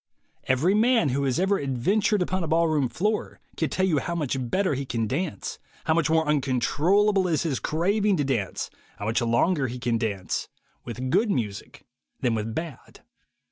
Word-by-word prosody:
Every 145 +9 +2
man 225 - +3
who 140 +2 0
has 130 +3 0
ever 195 +2 +2
adventured 185 - +1
upon 185 0 -2
a - - -3
ball 165 +2 +3
room 150 -5 +1
floor 210 - -2 0.2
can 160 - -1
tell 190 - +1
370U 160 -6 +2
how 170 +6 -3
much 135 -6 -2
better 190 0 +1
he 140 +1 -2
can 115 -4 -2
dance, 150 - -3 0.2
how 160 - +2
much 165 -1 +1
more 160 -1 +2
uncontrollable 155 - +2
is 160 -3 +1
his 150 -6 -1
craving 200 +5 +1
to 145 - +1
dance, 120 -9 -2 0.3
how 100 - -5
much 110 +2 +1
longer 130 +6 +2
he 125 +1 -5
can 120 -2 0
dance, 100 -6 -2 0.4
with 125 +2 -4
good 225 +8 +3
music 105 - -3 0.3
than 125 -3 +1
with 110 0 -3
bad. 160 -5 -7
150 Hz, 180 wpm, -26 LUFS, 125-185 Hz, 0.4 s, man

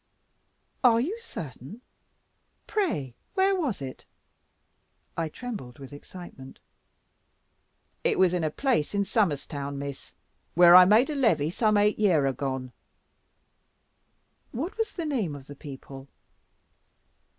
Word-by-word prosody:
"Are 235 -2 +6
you 320 - -1
certain? 155 - -9 0.8
Pray 300 - -1 0.2
where 385 0 +3
was 275 - -2
it?" 130 -1 -8 1.1
I 165 -1 -2
trembled 200 - -7
with 135 0 -11
excitement. 145 -3 -11 1.5
"It - - +2
was 185 -2 +4
in 175 -2 0
a 155 - +1
place 220 - 0
in 200 0 +1
Somers 190 -9 +1
town, 140 -1 -5
Miss; 140 -1 -7 0.4
where 175 0 +8
I 180 0 +10
made 225 +9 +4
a - - -3
levy, 165 - +2
some 215 +2 +2
eight 210 +1 +2
year 175 -9 +3
agone." 130 -1 -3 1.8
"What 310 +10 -4
was 445 -2 -2
the 335 - -5
name 225 - -1
of 135 -2 -11
the 145 - -11
people?" 135 -1 -10
175 Hz, 125 wpm, -27 LUFS, -, 1.8 s, I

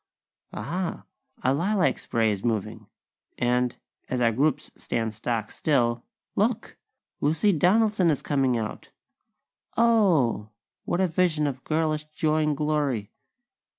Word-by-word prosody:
Aha!! 180 0 -4 0.4
A 130 - +3
lilac 175 - +1
spray 115 -2 +1
is 100 -2 -4
moving; 110 -1 -2 0.5
and, 125 0 +1 0.3
as 130 - -1
our 115 -1 +3
groups 140 +5 0
stand 115 -2 -2
stock 110 0 -3
still, 120 -5 +1 0.3
look! - - 0 0.4
Lucy 165 +8 +2
Donaldson 190 +2 +3
is 150 - 0
coming 135 -4 +1
out! 110 -2 -5 0.9
Oh! 180 - +3 0.4
What 175 - 0
a 190 - +3
vision 165 -3 +1
of 130 -3 -3
girlish 155 -1 0
joy 155 0 0
and 150 -2 0
glory!! 145 -8 -1
145 Hz, 120 wpm, -26 LUFS, 120-165 Hz, 0.9 s, A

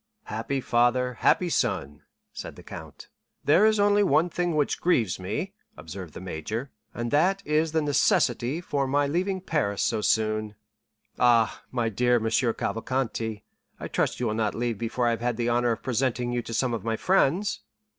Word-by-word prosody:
"Happy 115 +5 -3
father, 125 +1 +2
happy 180 - +3
son!" 95 - -1 0.3
said - - -7
the - - -13
count. - - -10 0.4
"There 170 +9 +5
is 215 -1 +2
only 205 0 +4
one 180 -3 +3
thing 175 -2 -1
which 150 -2 0
grieves 115 - +2
me," 130 - -4 0.2
observed 90 -1 -9
the - - -6
major, 95 - -5 0.2
"and 120 0 -4
that 185 +7 +2
is 155 +1 +1
the 160 -1 +1
necessity 135 0 +2
for 140 -5 -1
my 145 +2 +2
leaving 185 +6 -1
Paris 140 - -1
so 110 -2 0
soon." 110 0 0 0.6
"Ah, 120 -2 +3
my 120 -3 0
dear 120 +3 +2
M. 115 - +1
Cavalcanti, 115 -1 -1 0.4
I - - -5
trust - - -1
you 125 - -1
will 110 - 0
not 110 -1 -1
leave 115 -2 -2
before 120 +1 -1
I 120 - +3
have 115 - -2
had 120 -1 -1
the 120 0 0
honor 120 0 +2
of 115 - -3
presenting 125 -1 0
you 120 0 -1
to 115 - -9
some 125 0 +1
of 115 - -3
my 115 0 -1
friends." 190 - +2
120 Hz, 180 wpm, -26 LUFS, 110-150 Hz, 0.6 s, There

